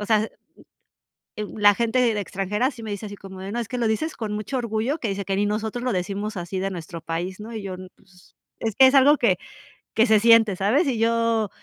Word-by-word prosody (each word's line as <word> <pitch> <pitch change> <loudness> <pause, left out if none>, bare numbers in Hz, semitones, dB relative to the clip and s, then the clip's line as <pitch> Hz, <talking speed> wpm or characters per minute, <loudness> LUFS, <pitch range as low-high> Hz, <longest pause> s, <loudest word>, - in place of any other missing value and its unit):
o 210 - -4
sea, 215 -1 +3 1.1
eh, 215 - -3
la 205 -1 +6
gente 235 +2 +1
de 230 -4 +2
extranjera 205 +7 -1
sí 235 -2 -11
me 220 - -6
dice 205 +1 -5
así 205 - -8
como 190 -1 -11
de 195 +1 -6
no: 240 - -2
"Es 230 - -5
que 250 - -4
lo 235 - +1
dices 305 +9 -1
con 215 -2 -4
mucho 215 +5 -3
orgullo", 235 +6 -1
que 230 - -3
dice: 195 0 -3
"Que 195 0 -1
ni 205 +1 +1
nosotros 220 +3 -2
lo 250 - 0
decimos 200 +3 -3
así 175 +2 -4
de 195 +1 -1
nuestro 170 -1 -7
país", 175 +3 -4
¿no? 220 +2 -8
Y 215 - -5
yo 190 -2 -5 0.2
pues, 185 -2 -23 0.4
es 265 0 +7
algo 285 +3 +6
que 190 -7 +2 0.6
que 225 - +4
se 215 -1 +5
siente, 225 -2 +5
¿sabes? 220 - +2
Y 245 -4 0
yo 230 -2 +1
215 Hz, 230 wpm, -24 LUFS, 195-230 Hz, 1.1 s, es